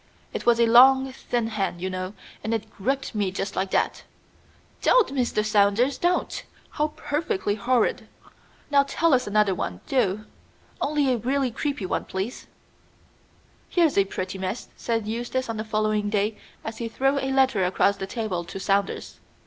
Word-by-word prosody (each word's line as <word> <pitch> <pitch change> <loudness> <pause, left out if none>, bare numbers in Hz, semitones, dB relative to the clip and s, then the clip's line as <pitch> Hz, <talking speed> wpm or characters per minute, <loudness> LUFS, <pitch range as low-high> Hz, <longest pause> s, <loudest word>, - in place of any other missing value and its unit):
"It - - -5
was 235 -1 +5
a 235 - +6
long 265 +3 +6
thin 240 -2 -2
hand, 195 -5 -2
you 185 - -2
know, 185 +1 -4 0.3
and 225 +1 0
it 220 0 -5
gripped 270 +7 -2
me 205 -3 0
just 195 +1 -4
like 195 - -1
that." - - 0 0.8
"Don't - - +4
Mr. 245 -5 0
Saunders! 210 +5 +3
Don't! 350 +1 0 0.3
How 300 0 0
perfectly 290 - -1
horrid! 235 +3 +1 0.6
Now 280 -1 +6
tell 300 +3 +1
us 250 -4 +2
another 205 -1 +3
one, 90 - -4
do. 215 -5 0 0.6
Only 285 -3 +2
a - - 0
really 260 +3 0
creepy 280 -3 -3
one, - - -2
please!" 190 +6 -5 1.2
"Here's 335 -4 +3
a 200 - +5
pretty 190 0 -5
mess!" 190 +5 -4
said 225 -2 -2
Eustace 240 +4 -2
on 230 -1 -3
the 215 - -2
following 215 -1 0
day 210 +1 0 0.3
as 225 - -5
he 235 - -2
threw 270 +5 +1
a 270 - -2
letter 265 -7 +3
across 195 +2 +2
the 195 -1 -5
table 200 -5 -3
to 175 +3 -7
Saunders. 195 0 -1
220 Hz, 165 wpm, -25 LUFS, 200-265 Hz, 1.2 s, a